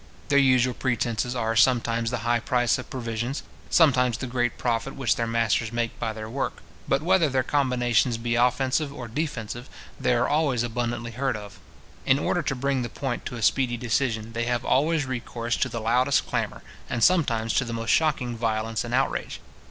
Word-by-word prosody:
Their 140 - +5
usual 130 -2 +4
pretences 120 -1 -1
are, 115 -2 -1
sometimes 115 0 +3
the 120 -2 -4
high 120 0 +2
price 120 0 +1
of - - -8
provisions, 120 +1 -3 0.3
sometimes 125 -7 +4
the - - -4
great 120 -1 -1
profit 120 +2 -1
which 135 -3 +1
their 115 - -1
masters 115 -1 +1
make 120 -1 -2
by 115 -2 -1
their 110 0 -7
work. 130 +5 -4 0.2
But 135 +2 +1
whether 175 -3 +3
their 130 -1 +1
combinations 125 -4 +1
be 115 0 -2
offensive 130 +4 +1
or 130 -4 -7
defensive, 120 -3 -4 0.3
they 125 - +2
are 120 +1 +2
always 145 -6 +1
abundantly 120 0 -3
heard 130 0 -1
of. 105 -2 -11 0.4
In 135 - +4
order 175 +4 0
to 135 -2 -2
bring 135 0 0
the 120 - -3
point 135 -1 -4
to - - -6
a 115 - -5
speedy 125 +1 +2
decision, 115 -2 -1
they 115 +1 -1
have 120 -1 -1
always 150 +2 +2
recourse 120 -2 -3
to - - 0
the 115 - -4
loudest 125 +5 +2
clamour, - - -3 0.3
and 120 - -1
sometimes 120 -11 +3
to - - +2
the 120 - -6
most 115 -1 -1
shocking 140 -7 +1
violence 110 -1 -1
and 120 +1 -2
outrage. 135 +1 -1
120 Hz, 190 wpm, -25 LUFS, 115-135 Hz, 0.4 s, Their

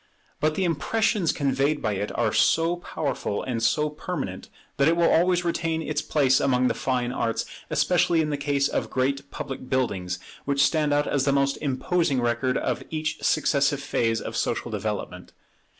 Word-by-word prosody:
But 155 0 +1
the 190 - 0
impressions 180 +2 +1
conveyed 140 +2 0
by 110 - -1
it 100 +1 -3
are 115 -3 +1
so 165 +2 +3
powerful 140 -11 -3
and 120 -3 -3
so 150 +6 +2
permanent, 150 - -5 0.3
that 140 +1 +4
it 165 +1 +3
will 170 -1 +4
always 175 +1 +3
retain 165 -1 -1
its 150 -1 -1
place 140 -4 +2
among 125 -2 +2
the - - +1
fine 125 -2 -1
arts, 115 -2 -1 0.2
especially 175 -2 +2
in 155 -1 0
the - - 0
case 140 -1 +1
of - - -2
great 135 +2 -1
public 130 -1 -7
buildings, 95 -9 -1 0.3
which 140 0 +2
stand 155 -2 +1
out 145 0 +2
as 135 -2 0
the 140 - +3
most 140 0 +2
imposing 145 +1 0
record 120 +2 0
of - - -1
each 155 -1 -3
successive 140 -1 +2
phase 115 -5 0
of - - -6
social - - -1
development. - - -4
140 Hz, 175 wpm, -25 LUFS, 130-160 Hz, 0.3 s, that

